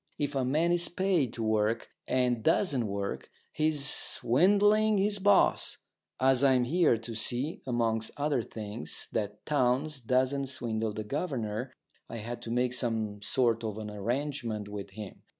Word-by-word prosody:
If 145 0 -1
a 135 -2 0
man 155 +7 +2
is 175 0 +3
paid 175 - +1
to 115 - -4
work, 110 +1 0 0.2
and 125 -2 +1
doesn't 145 - +2
work, 100 0 -4 0.2
he's 155 -2 +2
swindling 205 - +3
his 200 +1 +1
boss. 200 0 +3 0.4
As 130 0 +3
I'm 130 -2 +4
here 155 -1 +3
to 115 +1 -7
see, 120 +7 -2
amongst 115 -2 0
other 145 -3 +1
things, 110 0 -4
that 105 -1 -3
Townes 140 +1 +1
doesn't 130 +3 +1
swindle 115 -4 -2
the 110 - -4
governor, 125 -3 -3 0.4
I 115 - -6
had 115 +2 -6
to - - -7
make 125 +1 +1
some 110 -4 -2
sort 115 +1 +1
of 110 -2 -3
an 105 -1 -6
arrangement 115 0 -3
with 100 -1 -6
him. 105 0 -9
125 Hz, 150 wpm, -30 LUFS, 110-145 Hz, 0.4 s, I'm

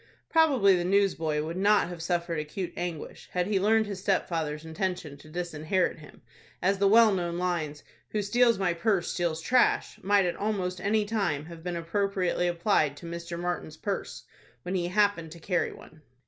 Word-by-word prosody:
Probably 270 - +5
the 175 - 0
newsboy 175 -5 +1
would 165 +3 -5
not 205 +1 +4
have 175 -2 -7
suffered 170 -1 -1
acute 170 +4 -5
anguish, 175 -3 -6
had 180 -1 +1
he 200 0 +1
learned 220 +3 +3
his 200 -2 -5
stepfather's 160 -5 -1
intention 160 -2 -3
to 155 - -15
disinherit 170 +1 -1
him, 150 - -15 0.4
as 195 +1 +1
the 200 - +4
well 220 +1 +6
known 175 -2 -2
lines, 165 -5 -2 0.3
"Who 210 -1 -1
steals 235 +2 +3
my 185 -3 +1
purse, 185 +1 0
steals 170 -2 -1
trash," 250 +7 +2
might 200 0 +3
at 175 - -1
almost 190 -4 -2
any 210 +2 +1
time 195 -9 -1
have 165 0 -10
been 175 -1 -3
appropriately 180 +1 0
applied 170 -5 +1
to 170 - -11
Mr. 170 0 -6
Martin's 175 -3 -4
purse, 200 -2 -4 0.4
when 180 - -4
he 175 -2 0
happened 185 -4 +1
to 170 - -12
carry 175 +1 0
one. 155 -1 -15
180 Hz, 175 wpm, -28 LUFS, 165-200 Hz, 0.4 s, well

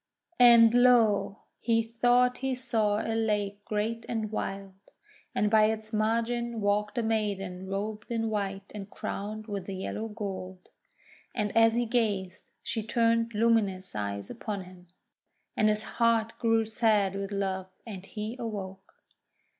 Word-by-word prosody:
And 235 -2 +8
lo! 225 -5 +4 0.2
he 230 -1 +2
thought 245 +2 +2
he 265 -1 -1
saw 225 -5 0
a 225 - -1
lake 210 -2 -1
great 220 +2 -2
and 220 -2 -2
wild, 195 -2 -4 0.6
and 210 0 +1
by 215 -1 +6
its 220 0 -2
margin 230 +2 0
walked 210 +2 0
a 235 - +1
maiden 195 -4 -2
robed 210 +2 -4
in 225 -1 -1
white 200 -2 -3
and 205 -1 -7
crowned 215 +2 -5
with 200 -3 -5
yellow 195 +3 -4
gold. 190 -4 -7 0.7
And 210 -3 -2
as 225 0 +5
he 240 0 +1
gazed, 210 -5 -1
she 225 - -2
turned 230 +1 +1
luminous 205 -5 +1
eyes 100 -1 -4
upon 205 -3 -5
him, 180 0 -15 0.7
and 215 - +3
his 215 0 0
heart 230 -1 +1
grew 225 -1 +2
sad 215 -3 +2
with 195 0 -4
love, 190 -2 -2 0.2
and 195 -5 -8
he 215 +3 -6
awoke. 195 -4 -6
215 Hz, 140 wpm, -28 LUFS, 195-230 Hz, 0.7 s, And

